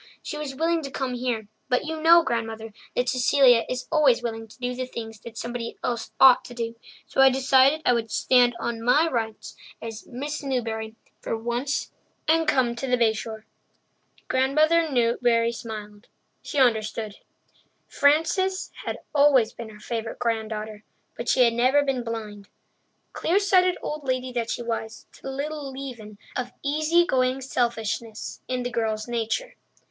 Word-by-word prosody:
"She - - -5
was 300 -3 -5
willing 330 +3 +1
to 275 - -6
come 265 -1 -3
here, 240 -4 -2 0.2
but 250 +2 +1
you 320 0 -4
know, 335 +1 +7
Grandmother, 225 -4 -3 0.2
that 250 - +1
Cecilia 255 -1 +4
is 255 0 -4
always 285 -7 +4
willing 225 -1 -4
to 215 - -17
do 250 -1 -3
the 255 0 -4
things 225 -3 -8
somebody 235 0 -5
else 235 -2 -2
ought 260 -1 +8
to 245 - -10
do, 230 -1 -4 0.3
so - - +1
I 270 - +8
decided 265 +3 +4
I 245 - +5
would 230 -1 -1
stand 245 +1 +3
on 235 -1 -3
my 290 +8 +4
rights 225 -6 -3 0.2
as 225 -1 -8
'Miss 290 +5 -5
Newbury' 225 -5 -3 0.2
for 225 - -3
once 240 +5 -2 0.4
and 325 0 +3
come 245 -3 +2
to 270 - -3
the 250 0 +2
Bay 230 -2 +3
Shore." 220 0 -7 0.8
Grandmother 310 +5 +3
Newbury 235 -1 +2
smiled. 215 -2 -8 0.3
She - - -6
understood. 220 -4 +1 0.7
Frances 325 +6 +2
had - - -3 0.2
always 275 -6 +4
been 230 -2 -8
her 210 -1 -13
favourite 225 0 -4
granddaughter, 220 -2 -3 0.3
but 235 0 -4
she 255 - +5
had 235 -1 +3
never 255 +5 +3
been 265 -3 -1
blind, 215 -3 -6 0.6
clear 350 +4 +1
sighted 370 -3 +3
old 300 0 -4
lady 255 -1 -2
that 235 -2 -2
she 240 - -3
was, 225 -1 -4
to - - -19
the - - -6
little 285 +1 -4
leaven 245 -6 -8 0.2
of 250 0 -3
easy 310 +4 +3
going 255 -4 +1
selfishness 235 -3 -3
in 255 -1 -2
the 245 - -3
girl's 220 -1 -1
nature. 240 - -2
245 Hz, 165 wpm, -25 LUFS, 225-275 Hz, 0.8 s, ought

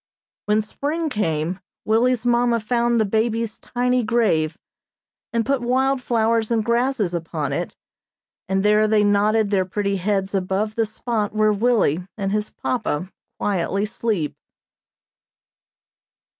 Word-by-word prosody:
When 210 +1 +2
spring 305 +9 -3
came 170 - -1 0.3
Willie's 240 +2 +2
mamma 240 -1 +3
found 235 +1 +1
the 220 - +3
baby's 220 +1 -1
tiny 250 0 0
grave, 210 -9 +1 0.7
and 230 -1 0
put 275 -2 +1
wild 260 +2 +1
flowers 225 -2 +1
and 225 -2 +1
grasses 235 -5 +1
upon 165 -4 -3
it, - - -3 0.7
and 190 +1 +1
there 210 +1 +4
they 215 -1 +3
nodded 205 +1 +2
their 195 -2 +3
pretty 200 +1 -1
heads 195 +1 -1
above 195 +3 -1
the 225 0 0
spot 215 -1 -2
where 215 0 +3
Willie 205 -7 +1
and 195 -2 -2
his 210 0 -1
papa 190 -7 -3 0.3
quietly 195 +1 0
sleep. 210 -7 -2
215 Hz, 130 wpm, -22 LUFS, 195-235 Hz, 0.7 s, there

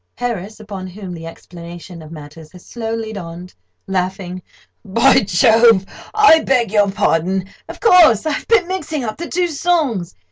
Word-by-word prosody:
HARRIS 220 -4 -4
(upon 200 -3 -8
whom 185 0 -9
the 165 -1 -8
explanation 170 +1 -11
of 155 0 -12
matters 155 0 -12
has 180 - -15
slowly 225 -1 -5
dawned—laughing): 180 - -6 0.4
"By 230 +6 +4
Jove! 220 +1 +4 0.3
I 420 -7 +6
beg 245 -8 0
your 205 -2 +3
pardon. 190 -1 0 0.2
Of - - -9
course—I've 315 - +4
been 435 -6 +3
mixing 320 -6 -4
up 215 -2 -5
the 340 - -6
two 355 +1 0
songs. 300 - -1
205 Hz, 140 wpm, -18 LUFS, 180-250 Hz, 0.4 s, I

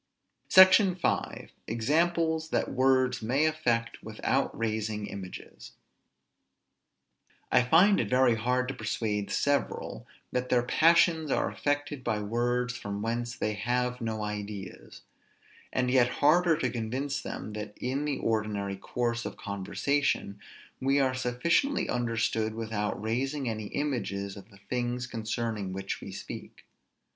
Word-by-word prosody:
SECTION 185 0 +7
V. 180 - -2 0.2
EXAMPLES 160 +7 +1
THAT - - 0
WORDS 130 -1 +2
MAY 130 +7 +2
AFFECT 120 -7 0
WITHOUT 110 +5 0
RAISING 110 -2 -2
IMAGES. 100 -2 -9 1.8
I 125 - +6
find 175 +11 +5
it 105 - -1
very 125 0 +4
hard 125 +3 0
to - - -2
persuade 110 -3 -2
several 140 - -1 0.2
that 125 0 -2
their 120 -1 +3
passions 160 +3 +4
are - - +1
affected 145 -1 -2
by 105 - 0
words 120 +3 -1
from 100 -3 -5
whence 120 +1 -2
they 105 - -1
have 125 +4 -1
no 110 -1 -2
ideas; 105 -1 -6 0.7
and 125 -1 0
yet 125 -2 +5
harder 160 +5 +3
to 165 - -1
convince 130 +5 -2
them 105 - -6
that 105 0 -7
in 135 +3 -2
the 145 -2 -1
ordinary 105 -3 -1
course 120 +3 -2
of - - -6
conversation 100 +3 -1 0.4
we 135 +2 +2
are 130 -2 +2
sufficiently 130 - +1
understood 115 -2 0
without 110 -2 -2
raising 130 +6 -2
any 110 -2 -3
images 100 -9 -2
of 100 +1 -12
the 100 - -17
things 125 +1 -2
concerning 110 -4 -3
which 95 +1 -4
we - - -7
speak. - - -9
120 Hz, 130 wpm, -29 LUFS, 110-135 Hz, 1.8 s, SECTION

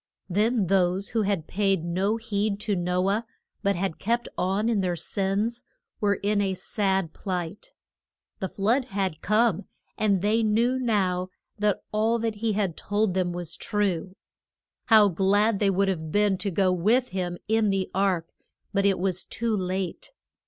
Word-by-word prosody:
Then 210 +3 +1
those 185 +1 +1
who 225 - 0
had 195 -6 0
paid 195 -3 0
no 190 +6 0
heed 210 -2 -1
to 210 -2 0
No 180 +1 0
ah, 210 +3 +1 0.4
but 200 -1 +1
had 185 -1 -2
kept 235 +3 0
on 195 +4 0
in 225 -4 +2
their 180 -2 0
sins, 200 +7 -1 0.4
were 205 -2 +2
in 205 +2 0
a 190 -1 0
sad 190 -2 -1
plight. 185 -1 -5 0.6
The 190 - -3
flood 235 +7 +1
had 190 -9 -2
come, 215 -3 +2 0.3
and 200 -3 +2
they 215 +2 +3
knew 230 +4 +2
now 190 -7 0 0.3
that 210 -2 +1
all 220 +2 +2
that 225 -2 -2
he 220 0 0
had 195 -5 -1
told 205 -1 0
them 180 -1 0
was 175 -1 -5
true. 190 -3 -1 0.7
How 215 -3 +7
glad 200 +3 +2
they 205 - +3
would 195 +1 +2
have 160 -5 -2
been 205 0 +3
to 200 - -1
go 190 0 +2
with 225 +8 +2
him 180 -2 -3
in 220 0 +2
the 195 -1 0
ark. 185 -4 +1 0.5
But 200 0 +3
it 195 - +2
was 185 0 0
too 230 -1 -2
late. 185 - -3
200 Hz, 165 wpm, -26 LUFS, 185-215 Hz, 0.7 s, How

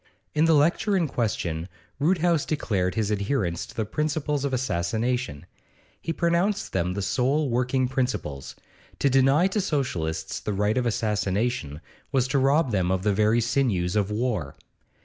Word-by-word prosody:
In 155 +1 +3
the 165 -1 +5
lecture 180 +7 +2
in 170 -4 +1
question 90 - -2 0.3
Roodhouse 170 0 +2
declared 95 - -1
his 110 -1 0
adherence 100 -4 -1
to - - -14
the 110 - -1
principles 150 +3 -1
of 140 - -1
assassination; 120 - -1 0.6
he 165 - -3
pronounced 175 +5 0
them 90 0 0
the 100 - -2
sole 135 +6 +1
working 125 +2 +1
principles; 105 - -3 0.4
to 140 - +2
deny 135 +5 +4
to 205 +2 0
Socialists 125 - -2
the 105 - -3
right 105 +4 +1
of 120 - 0
assassination 105 - -1 0.3
was 130 -2 +2
to 140 - +2
rob 135 +1 +3
them 95 -4 +1
of 95 0 0
the 105 -1 +2
very 110 +3 +3
sinews 110 -8 0
of 105 -1 +1
war. 105 - -2
120 Hz, 155 wpm, -25 LUFS, 100-140 Hz, 0.6 s, the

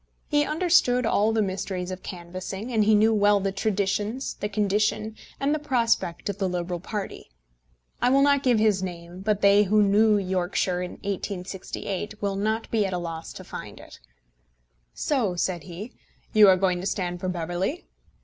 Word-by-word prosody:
He 295 -1 +2
understood 305 -7 +3
all 220 0 +2
the 220 -1 +2
mysteries 185 -1 -3
of 185 - -6
canvassing, 185 +5 -6
and 215 -2 +3
he 215 0 +5
knew 220 +2 +4
well 205 -1 +4
the 195 0 -1
traditions, 205 +4 -1
the 205 - -4
condition, 215 +1 0 0.2
and 275 +2 +1
the 305 - 0
prospect 235 - 0
of 200 -1 -3
the 190 -2 0
Liberal 175 0 -3
party. 200 - -6 0.7
I 245 - +4
will 275 +2 +4
not 280 -1 +4
give 250 -4 +3
his 215 -3 +3
name, 175 -1 -7
but 210 0 0
they 200 +1 +6
who 210 +2 +4
knew 210 +2 +4
Yorkshire 185 -1 -1
in 180 - -5
1868 195 +1 -4
will 200 -1 -1
not 220 +3 -1
be 220 -2 +2
at 190 - -4
a - - 0
loss 165 -2 -6
to - - -9
find - - -9
it. - - -13 1.0
"So," 235 -11 0
said 175 0 -2
he, 190 +7 -8 0.4
"you 215 -1 +8
are 185 - +6
going 180 -1 +1
to 190 - -3
stand 180 -3 -2
for 185 - -2
Beverley?" 180 - -3
200 Hz, 180 wpm, -25 LUFS, 185-220 Hz, 1.0 s, you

